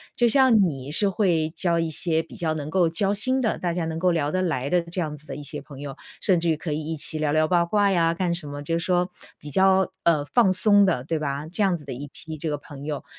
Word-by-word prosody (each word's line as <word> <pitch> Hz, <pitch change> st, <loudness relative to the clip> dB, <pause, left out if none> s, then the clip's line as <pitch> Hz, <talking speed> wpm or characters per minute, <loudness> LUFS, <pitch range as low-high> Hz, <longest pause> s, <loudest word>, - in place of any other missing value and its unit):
就 240 Hz, -, +2 dB
像 240 Hz, -4 st, +5 dB
你 140 Hz, -5 st, -3 dB
是 200 Hz, +6 st, +2 dB
会 175 Hz, -6 st, +1 dB
交 170 Hz, -3 st, 0 dB
一 165 Hz, -1 st, 0 dB
些 160 Hz, +1 st, +1 dB
比 -, -, -14 dB
较 160 Hz, -2 st, -1 dB
能 150 Hz, -1 st, -5 dB
够 175 Hz, 0 st, +2 dB
交 195 Hz, +4 st, +1 dB
心 255 Hz, +6 st, +2 dB
的， 225 Hz, -, 0 dB
大 175 Hz, -2 st, -1 dB
家 175 Hz, -1 st, -2 dB
能 160 Hz, 0 st, -4 dB
够 180 Hz, +1 st, +2 dB
聊 150 Hz, -3 st, 0 dB
得 185 Hz, -, 0 dB
来 140 Hz, -7 st, -1 dB
的 180 Hz, +2 st, +3 dB
这 170 Hz, +2 st, -4 dB
样 150 Hz, -2 st, -4 dB
子 150 Hz, -, -18 dB
的 -, -, -6 dB
一 145 Hz, -, -8 dB
些 145 Hz, +1 st, -5 dB
朋 140 Hz, -2 st, -12 dB
友， 140 Hz, -2 st, -7 dB, 0.2 s
甚 185 Hz, -4 st, +3 dB
至 170 Hz, 0 st, 0 dB
于 160 Hz, -, +2 dB
可 155 Hz, 0 st, -5 dB
以 155 Hz, +1 st, -2 dB
一 160 Hz, +1 st, -4 dB
起 155 Hz, +1 st, +1 dB
聊 150 Hz, -1 st, 0 dB
聊 155 Hz, 0 st, +3 dB
八 175 Hz, -1 st, +3 dB
卦 200 Hz, +2 st, +2 dB
呀， 165 Hz, -2 st, +2 dB
干 175 Hz, 0 st, -1 dB
什 170 Hz, -3 st, -5 dB
么， 145 Hz, 0 st, -7 dB
就 165 Hz, +3 st, -1 dB
是 -, -, -2 dB
说， 180 Hz, 0 st, +1 dB, 0.3 s
比 150 Hz, -, -10 dB
较， 190 Hz, +2 st, +3 dB
呃， 155 Hz, -4 st, +3 dB
放 195 Hz, +4 st, +3 dB
松 205 Hz, +1 st, +5 dB
的 145 Hz, -9 st, 0 dB
对 160 Hz, +2 st, -2 dB
吧。 145 Hz, 0 st, -3 dB
这 210 Hz, -, -2 dB
样 190 Hz, -3 st, +3 dB
子 155 Hz, -, -8 dB
的 135 Hz, -, -8 dB
一 140 Hz, +4 st, -6 dB
批 160 Hz, -1 st, -6 dB
这 155 Hz, +1 st, -3 dB
个 145 Hz, -, -2 dB
朋 145 Hz, -1 st, -11 dB
友， 150 Hz, -2 st, -4 dB
165 Hz, 305 characters per minute, -24 LUFS, 150-185 Hz, 0.3 s, 像